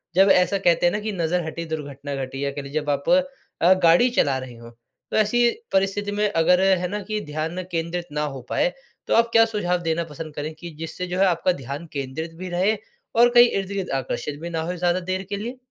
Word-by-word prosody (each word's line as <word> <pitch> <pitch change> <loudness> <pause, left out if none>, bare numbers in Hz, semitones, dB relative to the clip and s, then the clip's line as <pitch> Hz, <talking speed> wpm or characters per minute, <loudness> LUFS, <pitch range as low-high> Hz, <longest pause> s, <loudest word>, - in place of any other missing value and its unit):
जब 195 +2 +6
ऐसा 185 +2 +4
कहते 175 -3 +2
हैं 175 - +3
ना, 210 - -1
कि 215 +1 -3
नज़र 175 -2 0
हटी 165 +1 -5
दुर्घटना 140 -1 -6
घटी 135 +2 -6
या 140 - -1
कह 145 +1 -5
लीजिए 140 +3 -3
जब 150 - -5
आप 140 -1 -1 0.5
अ, 175 +3 +7
गाड़ी 170 +9 +6
चला 135 -2 +3
रहे 130 -2 -9
हों। 115 0 -12 0.4
तो - - +1
ऐसी 235 +3 +4 0.2
परिस्थिति 195 +1 +1
में 210 +1 +1
अगर 180 0 +3
है 190 -2 +3
ना, 205 +3 -3
कि 215 +2 -3
ध्यान 155 +4 -3
केंद्रित 170 +1 -2
ना 150 0 -1
हो 130 - -7
पाए 180 - +1 0.3
तो - - +1
आप 230 0 +4
क्या 225 - +7
सुझाव 205 -5 -1
देना 165 0 0
पसंद 155 -1 -8
करें 150 +2 -4
कि 170 +2 -9
जिससे 165 +3 -5
जो 180 +1 -3
है 195 - +5
आपका 180 0 +2
ध्यान 140 +6 -6
केंद्रित 145 +4 -4
भी 185 +1 -6
रहे 185 +5 +1 0.4
और 240 +1 +6
कहीं 240 0 +9
इर्द-गिर्द 195 -1 -3
आकर्षित 145 +2 -4
भी 170 - -5
ना 165 -1 -2
हो 175 +3 -3
ज़्यादा 175 +1 +1
देर 185 +1 -3
के 200 - -2
लिए? 235 +5 -5
175 Hz, 230 wpm, -23 LUFS, 155-195 Hz, 0.5 s, कहीं